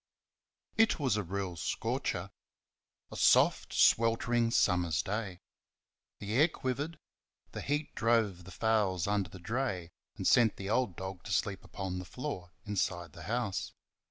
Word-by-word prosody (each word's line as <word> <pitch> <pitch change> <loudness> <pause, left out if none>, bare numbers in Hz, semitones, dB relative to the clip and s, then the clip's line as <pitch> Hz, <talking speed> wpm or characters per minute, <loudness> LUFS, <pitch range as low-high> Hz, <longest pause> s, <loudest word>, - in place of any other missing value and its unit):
It 225 0 +4
was 130 -7 +2
a 105 - 0
real 95 -1 -4
scorcher. 80 - -2 0.8
A - - -7
soft, - - +4
sweltering 115 +1 +3
summer's 90 -8 +2
day. 100 -3 -4 0.8
The 105 +1 -5
air 145 +7 +6
quivered; 145 +1 -3 0.5
the - - -5
heat 145 +1 -2
drove 110 -6 +1
the - - -10
fowls 105 -5 +1
under 100 -2 0
the - - -10
dray 95 -3 -2 0.3
and - - -5
sent 115 -3 +5
the 100 +1 -4
old 115 -6 +1
dog 95 -1 -6
to - - -6
sleep 95 0 0
upon 95 0 -5
the 90 - -7
floor 95 -6 -6
inside 90 -4 -2
the 85 - -10
house. 115 -4 -2
100 Hz, 145 wpm, -32 LUFS, 90-120 Hz, 0.8 s, air